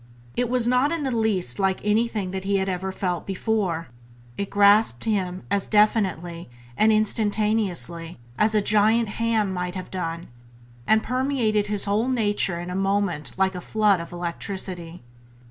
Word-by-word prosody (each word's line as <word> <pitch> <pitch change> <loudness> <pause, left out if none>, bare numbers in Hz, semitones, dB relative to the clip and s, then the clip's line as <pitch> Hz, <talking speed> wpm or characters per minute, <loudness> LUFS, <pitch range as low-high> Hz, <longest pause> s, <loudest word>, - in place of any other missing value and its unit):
It 245 -1 0
was 245 -1 +2
not 250 +4 +3
in 335 -3 -2
the 265 - -1
least 200 - +1
like 190 -1 +1
anything 210 -2 0
that 190 0 -4
he 200 +1 0
had 190 0 0
ever 190 0 -2
felt 180 -2 -3
before; 195 - -1 0.5
it 200 - -4
grasped 200 - +4
him 190 -4 -2
as 200 -1 0
definitely 190 - +1 0.3
and 220 - +4
instantaneously 210 -5 0 0.2
as 215 +6 +2
a 210 - +4
giant 215 +2 +3
hand 220 -4 +1
might 180 0 -3
have 185 -1 -7
done, 170 -2 -4 0.6
and 220 0 +4
permeated 250 -5 0
his 205 -1 -1
whole 210 +4 +1
nature 205 -7 +1
in 175 +1 -6
a - - -4
moment 195 -9 -1
like 190 0 +2
a 180 - -6
flood 210 -1 +2
of 170 - -8
electricity. 175 -1 -5
200 Hz, 160 wpm, -24 LUFS, 180-220 Hz, 0.6 s, grasped